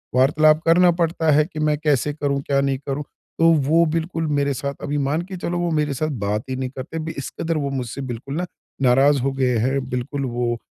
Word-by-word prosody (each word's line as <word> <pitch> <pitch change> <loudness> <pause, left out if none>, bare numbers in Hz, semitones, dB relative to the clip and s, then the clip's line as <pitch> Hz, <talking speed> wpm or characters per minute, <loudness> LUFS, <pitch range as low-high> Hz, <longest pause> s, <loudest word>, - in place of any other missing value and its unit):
वार्तालाप 155 +4 +4
करना 175 +2 +5
पड़ता 165 -2 +1
है 150 +1 +4
कि 155 -1 -8
मैं 150 -1 +1
कैसे 150 -1 +1
करूँ, 140 -2 -1
क्या 140 0 +1
नहीं 135 -1 0
करूँ। 140 +1 -2 0.4
तो 165 0 +6 0.2
वो 165 +2 +5
बिल्कुल 165 +1 -2
मेरे 145 -1 +1
साथ 140 +2 -3
अभी 145 0 -2
मान 145 +3 0
के 185 - -4
चलो 175 0 -3
वो 175 0 0
मेरे 150 -2 0
साथ 155 +4 -1
बात 105 +2 -1
ही 130 - -2
नहीं 130 0 -3
करते। 155 +5 -6
इस 140 - -4
कदर 165 -1 -1
वो 140 -2 -1
मुझसे 130 0 -4
बिल्कुल 130 +1 -5
ना 175 +3 -1 0.4
नाराज़ 135 +3 +4
हो 135 +2 0
गए 130 -3 +1
हैं। 130 +3 0
बिल्कुल 135 +3 -3
वो 120 -1 -1
145 Hz, 220 wpm, -22 LUFS, 135-155 Hz, 0.4 s, तो